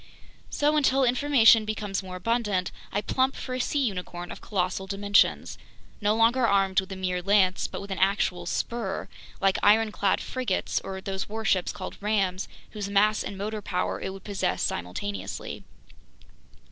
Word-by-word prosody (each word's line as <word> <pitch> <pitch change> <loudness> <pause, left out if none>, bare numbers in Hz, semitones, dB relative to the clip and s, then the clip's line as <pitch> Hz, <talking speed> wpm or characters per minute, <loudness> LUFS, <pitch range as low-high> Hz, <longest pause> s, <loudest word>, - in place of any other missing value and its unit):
"So, 295 +1 +2
until 270 -2 +3
information 245 -3 +5
becomes 210 -2 -3
more 185 -1 -8
abundant, 205 -2 0 0.2
I 205 - 0
plump 260 +5 +1
for 255 - -5
a 255 - -2
sea 275 +2 +1
unicorn 180 -4 -4
of - - -8
colossal 190 -1 -2
dimensions, 200 +1 +2 0.4
no 210 +1 +2
longer 230 +2 +4
armed 195 -2 +3
with 190 0 -5
a - - -4
mere 180 -1 -2
lance 190 -1 +3
but - - -6
with 200 0 -8
an 190 - -3
actual 185 -2 +1
spur, 225 0 -2 0.3
like 195 -1 +2
ironclad 210 -1 +3
frigates 250 -8 -2
or 190 0 -6
those 195 0 -4
warships 210 -4 0
called 185 - -7
'rams,' 195 -3 0 0.2
whose 205 -2 -5
mass 210 +2 +3
and 200 - -6
motor 210 +2 -3
power 180 -2 -2
it - - -3
would 195 0 -10
possess 190 - -1
simultaneously. 95 +2 -4
200 Hz, 160 wpm, -27 LUFS, 190-220 Hz, 0.4 s, information